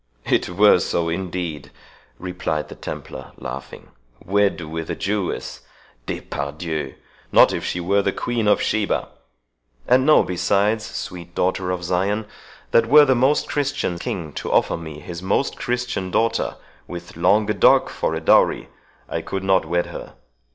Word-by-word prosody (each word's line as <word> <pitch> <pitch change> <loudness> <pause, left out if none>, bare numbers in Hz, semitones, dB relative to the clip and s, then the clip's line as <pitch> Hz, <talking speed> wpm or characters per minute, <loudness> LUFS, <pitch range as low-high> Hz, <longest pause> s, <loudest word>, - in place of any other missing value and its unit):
"It - - +1
were 100 +1 +5
so, 85 -1 -1
indeed," 85 -3 -4 0.5
replied 90 -5 -3
the - - -9
Templar, 65 - -8
laughing; 65 +2 -8 0.4
"wed 100 0 +2
with 80 0 -5
a - - -2
Jewess? 100 -2 -3 0.5
'Despardieux!'—Not 75 +3 -1
if - - -3
she 90 - -2
were 100 +4 +2
the 100 - 0
Queen 120 -1 -2
of 105 - +3
Sheba! 110 -2 0 0.8
And 130 +1 +5
know, 155 +2 +6
besides, 100 +4 +1
sweet 85 -1 -7
daughter 95 0 0
of 90 -1 -2
Zion, 95 +5 0 0.5
that 115 0 +4
were 150 +3 +8
the 130 - +4
most 130 +4 +2
Christian 145 -11 -1
king 80 -4 -4
to - - -4
offer - - +3
me 80 -2 -8
his 85 +2 -7
most 95 +9 0
Christian 120 -6 -2
daughter, 115 +5 0 0.3
with 85 0 -8
Languedoc 105 +4 +4
for 80 - -2
a - - -2
dowery, - - +3 0.4
I - - -3
could 95 -1 -4
not 95 -2 +3
wed 85 +2 0
her. - - -9
95 Hz, 145 wpm, -22 LUFS, 85-105 Hz, 0.8 s, were